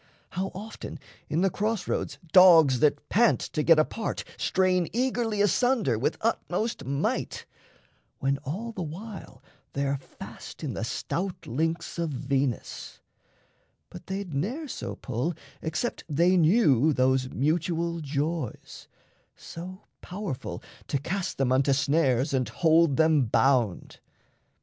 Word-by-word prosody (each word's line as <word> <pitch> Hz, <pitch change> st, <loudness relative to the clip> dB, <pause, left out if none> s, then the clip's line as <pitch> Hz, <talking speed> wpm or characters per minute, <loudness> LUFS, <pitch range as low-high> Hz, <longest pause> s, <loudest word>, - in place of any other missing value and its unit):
How 185 Hz, +2 st, -2 dB
often 210 Hz, -3 st, -7 dB, 0.3 s
in 160 Hz, -, +1 dB
the 195 Hz, -1 st, +2 dB
cross 215 Hz, 0 st, -1 dB
roads -, -, -2 dB
dogs 165 Hz, -8 st, +7 dB
that 150 Hz, +1 st, +2 dB
pant 235 Hz, +3 st, +4 dB
To 155 Hz, -, -3 dB
get 165 Hz, +1 st, +6 dB
apart 185 Hz, +8 st, -1 dB
strain 185 Hz, -2 st, +1 dB
eagerly 235 Hz, -4 st, 0 dB
asunder 225 Hz, -, +2 dB
With 125 Hz, -, 0 dB
utmost 225 Hz, -, -1 dB
might? 140 Hz, +2 st, -2 dB, 0.7 s
When 140 Hz, +1 st, 0 dB
all 180 Hz, -, -5 dB
the 195 Hz, -, -6 dB
while 170 Hz, -, -8 dB, 0.3 s
they're 140 Hz, 0 st, 0 dB
fast 135 Hz, -, -11 dB
In -, -, -3 dB
the -, -, -4 dB
stout 180 Hz, 0 st, -3 dB
links 160 Hz, +7 st, -2 dB
of 165 Hz, -1 st, 0 dB
Venus. 135 Hz, -3 st, -2 dB, 0.9 s
But -, -, -11 dB
they'd 195 Hz, -3 st, -4 dB
ne'er 235 Hz, -, -2 dB
So -, -, -5 dB
pull, 130 Hz, +7 st, -3 dB, 0.3 s
except 160 Hz, +9 st, -3 dB
they 170 Hz, +5 st, +3 dB
knew 160 Hz, -, +4 dB
those 130 Hz, 0 st, +2 dB
mutual 170 Hz, +4 st, 0 dB
joys 150 Hz, -2 st, -4 dB, 0.5 s
So 185 Hz, +4 st, -9 dB, 0.2 s
powerful 180 Hz, -8 st, -5 dB, 0.2 s
to -, -, 0 dB
cast 185 Hz, +7 st, -3 dB
them 135 Hz, -2 st, +1 dB
unto 135 Hz, +1 st, +3 dB
snares 140 Hz, -1 st, +2 dB
And 130 Hz, -2 st, 0 dB
hold 165 Hz, -3 st, +3 dB
them 155 Hz, -4 st, +4 dB
bound. 120 Hz, -4 st, +1 dB
165 Hz, 125 wpm, -27 LUFS, 140-190 Hz, 0.9 s, dogs